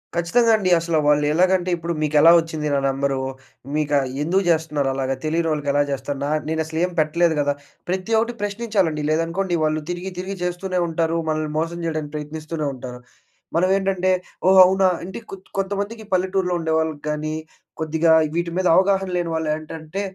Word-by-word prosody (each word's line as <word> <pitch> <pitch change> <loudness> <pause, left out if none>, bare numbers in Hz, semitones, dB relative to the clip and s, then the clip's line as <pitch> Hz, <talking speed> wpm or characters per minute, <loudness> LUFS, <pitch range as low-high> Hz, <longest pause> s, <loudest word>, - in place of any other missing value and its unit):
ఖచ్చితంగా 225 +8 +3
అండి. 190 -3 0
అసలు 165 -1 -1
వాళ్లు 150 0 +4
ఎలాగంటే, 185 +2 +2
ఇప్పుడు 170 +1 -3
మీకెలా 155 +2 +5
వచ్చింది 160 -2 -3
నా 140 - +2
నెంబరు? 135 0 0 0.6
మీకా 150 -1 +1 0.3
ఎందుకు 185 +5 +1
చేస్తున్నారు 155 -4 +1
అలాగా? 135 0 -1
తెలియనోళ్లకి 155 -2 0
ఎలా 145 0 +3
చేస్తారు? 140 +1 -3
నా 145 - -1 0.2
నేనసలు 160 0 -2
ఏం 180 - -5
పెట్టలేదు 160 +2 +2
కదా! 145 0 +1 0.4
ప్రతి 185 +4 -2
ఒకటి 230 +2 -1
ప్రశ్నించాలండి. 200 -7 -1
లేదనుకోండి, 165 +4 0
వాళ్లు 155 0 0
తిరిగి, 175 +2 -4
తిరిగి 190 +2 -4
చేస్తూనే 180 +1 -2
ఉంటారు. 165 0 0
మనల్ని 155 -1 -1
మోసం 165 +1 -2
చేయడానికి 155 -3 -3
ప్రయత్నిస్తూనే 155 +1 -5
ఉంటారు. 125 -1 -8 0.6
మనం 180 +2 +3
ఏంటంటే, 190 -1 0 0.4
"ఓహ్! 190 0 +7
అవునా?" 190 +1 +3 0.2
అంటే 190 +4 -6
కొత్ 190 -1 -10
కొంతమందికి 200 +3 -2
పల్లెటూర్లో 185 0 +1
ఉండేవాళ్లకి 160 -2 -1
కానీ, 150 +1 -2 0.5
కొద్దిగా 160 +1 +2 0.2
వీటి 170 0 -1
మీద 185 -1 +2
అవగాహన 190 0 +3
లేని 175 -1 -1
వాళ్లు 160 -1 -1
ఏంటంటే, 155 +3 -6
165 Hz, 160 wpm, -22 LUFS, 155-185 Hz, 0.6 s, ఓహ్